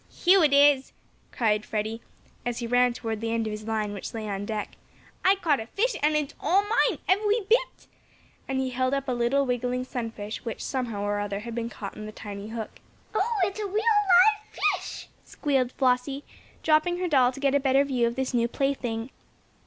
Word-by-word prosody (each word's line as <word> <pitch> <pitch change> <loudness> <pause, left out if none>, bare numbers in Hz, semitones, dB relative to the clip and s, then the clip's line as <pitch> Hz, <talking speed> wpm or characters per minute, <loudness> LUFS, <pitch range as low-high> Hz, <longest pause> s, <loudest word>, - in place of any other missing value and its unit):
"Here 370 0 +4
it 300 - +4
is!" 280 -1 +5 0.4
cried 215 -3 +1
Freddie, 220 +2 -3 0.4
as 245 -1 -2
he 240 - -3
ran 245 +1 +3
toward 225 -2 -4
the 225 0 -2
end 230 -1 0
of 215 - -3
his 210 +1 -7
line 215 -2 -1
which 205 - -7
lay 220 -1 -4
on 200 0 -4
deck. 215 -2 -3 0.5
"I 380 +1 +5
caught 320 -7 +1
a 225 - -6
fish, 475 - 0
and 305 +1 +3
it's 300 -1 -1
all 390 +3 +3
mine 435 +3 +2
every 415 +4 +2
bit," 465 +5 0 0.6
and 270 - -2
he 260 -1 -1
held 255 +2 0
up 275 0 -3
a - - 0
little, 245 +3 +1
wiggling 250 0 -1
sunfish 225 -4 -5
which, 230 -3 -5
somehow 235 -6 -3
or 205 0 -1
other, 205 0 -3
had 235 +1 -7
been 230 0 -3
caught 200 -3 -7
on 215 0 -7
the - - -7
tiny 205 -1 -8
hook. 225 -1 -6 0.3
"Oh, 435 +2 0
it's 395 +3 -1
a 420 - -2
real, 395 - -8
live 425 -1 +4 0.2
fish!" 375 - -7 0.2
squealed 265 -4 0
Flossie, 265 +2 +1 0.4
dropping 320 +3 +3
her 365 0 -1
doll 260 -6 +4
to 260 - -10
get 275 -1 +2
a 285 - +4
better 270 0 +3
view 255 -4 +1
of 235 - -3
this 265 0 -2
new 235 -1 +2
plaything. 245 -3 -2
255 Hz, 205 wpm, -26 LUFS, 225-310 Hz, 0.6 s, is